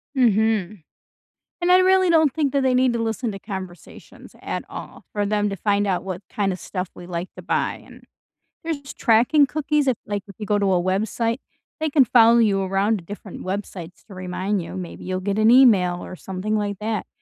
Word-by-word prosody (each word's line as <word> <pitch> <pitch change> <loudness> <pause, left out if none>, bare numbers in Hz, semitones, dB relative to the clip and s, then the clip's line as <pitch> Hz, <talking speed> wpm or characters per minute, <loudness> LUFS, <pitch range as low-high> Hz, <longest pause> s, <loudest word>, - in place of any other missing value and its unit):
Mhm, 215 -6 +1 0.8
and 355 +1 +2
I 365 - +8
really 375 -1 +4
don't 315 -5 +4
think 295 -4 0
that 275 - +2
they 260 -1 +2
need 255 -1 +3
to 235 - -2
listen 225 +1 -2
to 195 - -8
conversations 190 -4 -10
at - - -4
all - - -9
for 205 -1 0
them 210 0 0
to 195 - -4
find 205 +1 0
out 185 -1 0
what 190 0 -5
kind 200 -2 -1
of 185 - -5
stuff 185 -2 -5
we 175 - -11
like 175 +1 -4
to - - -9
buy, - - -1
and - - -16 0.6
there's 290 -4 -5
tracking 250 +5 +4
cookies 295 +1 0
if, 250 - +2
like, 205 -1 -3
if 200 - -12
you 215 - -6
go 205 0 +1
to 195 -1 +1
a 175 - +2
website, 220 +6 -1 0.4
they 315 0 0
can 280 -3 +4
follow 230 0 +6
you 205 -4 +3
around 195 +3 +1
to - - -13
different 205 -1 -9
websites 185 -3 -6
to 205 - -12
remind 185 +2 -2
you, - - -8
maybe 180 -2 -7
you'll 185 0 -3
get 200 +2 -2
an 220 +1 +5
email 200 -9 +5
or 185 - -8
something 190 +4 -4
like 205 -2 -2
that, 215 0 -3
210 Hz, 210 wpm, -22 LUFS, 190-245 Hz, 0.8 s, I